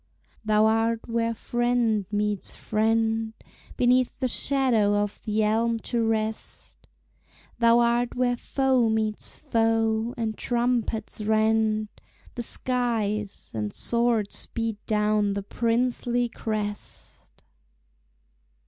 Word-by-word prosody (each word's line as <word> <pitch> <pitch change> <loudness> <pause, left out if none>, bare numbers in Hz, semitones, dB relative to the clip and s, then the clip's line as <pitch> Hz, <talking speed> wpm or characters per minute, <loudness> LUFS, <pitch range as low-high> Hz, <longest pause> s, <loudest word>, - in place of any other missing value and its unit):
Thou 215 0 +3
art 225 +1 +2
where 230 0 0
friend 240 -3 0
meets 210 -1 -1
friend, 225 +1 0 0.4
Beneath 250 0 +2
the 260 - +1
shadow 245 -5 +2
of 205 0 -2
the 215 0 +1
elm 230 +2 +1
to 235 -2 +1
rest 220 -1 -3 0.7
Thou 235 0 +5
art 240 0 +2
where 250 -1 +1
foe 260 -2 +1
meets 220 -1 -2
foe, 225 -3 +1
and 220 -2 -2
trumpets 235 -3 -1
rend 215 0 +2 0.4
The 240 - -4
skies, 225 -4 -1
and 105 -2 -3
swords 235 -3 0
beat 225 -2 -4
down 210 -1 +2
the 200 0 -3
princely 240 +2 0
crest. 210 -2 -6
225 Hz, 105 wpm, -26 LUFS, 215-240 Hz, 0.7 s, Thou